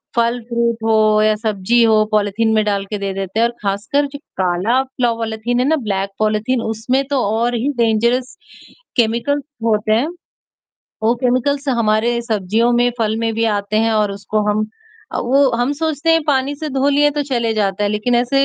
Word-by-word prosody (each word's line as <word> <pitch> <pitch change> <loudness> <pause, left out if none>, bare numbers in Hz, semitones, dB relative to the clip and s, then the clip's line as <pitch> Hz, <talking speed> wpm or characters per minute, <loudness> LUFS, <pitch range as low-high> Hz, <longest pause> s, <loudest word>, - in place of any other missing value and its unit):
फल 235 +1 +1
फ्रूट 235 -1 0
हो 215 -1 +3
या 215 0 +3
सब्जी 215 +1 +1
हो 220 -1 +4
पॉलीथीन 215 +1 +1
में 215 - +3
डाल 200 -1 -1
के 210 +1 -4
दे 200 -1 -3
देते 195 +2 -3
हैं 230 - +4
और 235 - -8
खासकर 205 +9 0
जो 285 - -7 0.2
काला 185 +8 +1 0.2
पॉलीथीन 230 0 -1
है 250 - +2
ना 320 - +3
ब्लैक 195 -1 -1
पॉलीथीन 215 +3 0
उसमें 230 +5 -1
तो 280 -2 +1
और 230 +4 0
ही 240 +5 -1
डेंजरस 235 +2 +1 0.6
केमिकल्स 240 +5 +1 0.2
होते 215 -1 +1
हैं। 235 +7 +2 1.0
वो 225 +2 +3
केमिकल्स 275 +3 0
हमारे 235 -1 +1
सब्जियों 220 +1 0
में, 240 0 +3
फल 220 -1 0
में 225 0 -1
भी 225 +1 0
आते 205 +1 -3
हैं 225 0 +2
और 210 -2 +1
उसको 200 +2 -2
हम 215 +1 0 0.5
अ, - - -2
वो 270 +2 +3
हम 245 +4 0
सोचते 315 +1 -1
हैं 325 - +4
पानी 280 -1 +1
से 310 +2 -5
धो 270 +1 +1
लिए 290 +1 +3
तो 295 0 -2
चले 235 -4 0
जाता 200 -2 0
है - - +1
लेकिन 215 +4 0
ऐसे, 250 +3 +2
230 Hz, 190 wpm, -18 LUFS, 215-250 Hz, 1.0 s, हो